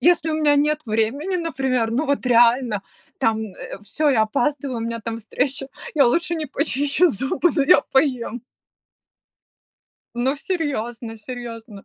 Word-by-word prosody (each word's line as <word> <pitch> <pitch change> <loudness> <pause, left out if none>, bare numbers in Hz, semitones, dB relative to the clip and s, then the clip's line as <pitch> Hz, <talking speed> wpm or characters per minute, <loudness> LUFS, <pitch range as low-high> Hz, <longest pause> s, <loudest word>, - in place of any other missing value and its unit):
Если 335 -2 +3
у 310 - 0
меня 295 -2 +3
нет 300 +1 +1
времени, 240 - 0
например, 260 -8 -1
ну 255 +7 0
вот 280 -2 0
реально 235 -3 +4 0.4
там, 220 -1 +1
э, - - -8
всё, 300 +9 0
я 225 -5 +3
опаздываю, 255 +3 -1
у - - -5
меня 230 0 -3
там 230 +1 -4
встреча, 265 +4 -2 0.3
я 280 -4 +5
лучше 335 +6 +1
не 315 -2 -3
почищу 285 +4 +1
зубы, 270 - +1
но 285 - +4
я 330 - +6
поем. 255 -4 +1 1.7
Ну 255 +4 +1
серьезно 240 -10 -3
серьезно. 230 -2 -8
260 Hz, 145 wpm, -22 LUFS, 230-295 Hz, 1.7 s, я